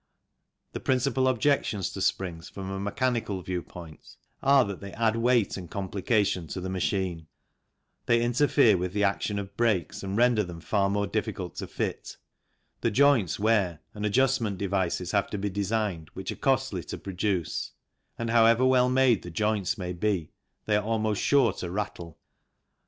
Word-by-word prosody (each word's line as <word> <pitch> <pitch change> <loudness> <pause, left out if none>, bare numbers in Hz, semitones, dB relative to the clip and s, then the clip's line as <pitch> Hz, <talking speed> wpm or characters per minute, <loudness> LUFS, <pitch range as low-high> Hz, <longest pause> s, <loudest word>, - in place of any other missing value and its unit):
The - - -5
principal 130 0 +1
objections 125 - +1
to - - -6
springs 85 -3 -2
from 95 -1 -7
a 95 - -4
mechanical 105 -2 -1
view 90 -1 -3
point 85 -3 -12 0.3
are 135 -1 +5
that 100 -2 -5
they 100 0 -8
add 115 -1 +1
weight 115 -3 +2
and 90 -3 -8
complication 100 -1 0
to 85 - -5
the 95 +1 -4
machine; 90 -3 -2 0.8
they 120 -1 +4
interfere 120 -3 +4
with 90 +1 -3
the 105 0 +1
action 100 +1 0
of 100 0 -6
brakes 105 -8 0
and 95 +1 -3
render 120 -2 +4
them 90 -3 -8
far 100 +3 +1
more 100 0 0
difficult 95 -3 -3
to - - -4
fit; - - -4 0.6
the - - +1
joints 130 - +3
wear 100 -7 +1
and 105 - -6
adjustment 115 -2 +1
devices 95 -2 -1
have 100 -1 +1
to 105 - -3
be 100 0 -2
designed, 100 -4 -2
which - - -4
are - - -5
costly - - 0
to - - -6
produce, 95 -3 -2 0.4
and 115 -1 -2
however 115 +2 +5
well 125 -1 +4
made 130 -4 +3
the 90 - -8
joints 105 +3 0
may 90 -2 -4
be, 90 -3 -1 0.3
they 105 - +2
are 105 - -1
almost 110 -1 0
sure 135 -8 +3
to 90 - -5
rattle. 90 -4 -5
100 Hz, 170 wpm, -27 LUFS, 95-115 Hz, 0.8 s, are